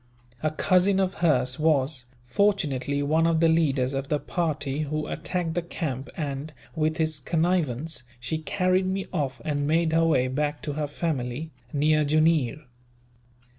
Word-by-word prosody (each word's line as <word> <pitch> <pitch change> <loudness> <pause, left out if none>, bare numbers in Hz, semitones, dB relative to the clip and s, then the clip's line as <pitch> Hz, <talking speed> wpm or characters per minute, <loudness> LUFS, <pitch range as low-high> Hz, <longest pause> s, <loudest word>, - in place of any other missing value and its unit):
A 155 - +1
cousin 185 +4 +3
of 190 -1 +1
hers 130 -6 +2
was, 140 -4 +1 0.2
fortunately, 145 -4 +1
one 160 +3 +2
of 165 -1 +2
the 165 - +5
leaders 140 -5 +2
of 135 0 -2
the 150 - +1
party 150 -4 -2
who 155 0 -2
attacked 175 +1 -2
the 175 - 0
camp 145 -6 -4
and, 145 -1 -4 0.2
with 155 0 0
his 155 -2 +1
connivance, 160 -3 0 0.2
she 155 +6 -2
carried 185 +2 +1
me 190 +1 -1
off 140 -6 -2
and 145 -2 -1
made 160 +1 +2
her 165 0 +4
way 130 -5 +3
back 145 +3 -2
to 145 - -2
her 150 0 -2
family, 145 -1 -3 0.2
near 155 +1 +3
Jooneer. 155 -2 +2
155 Hz, 155 wpm, -26 LUFS, 140-165 Hz, 0.2 s, the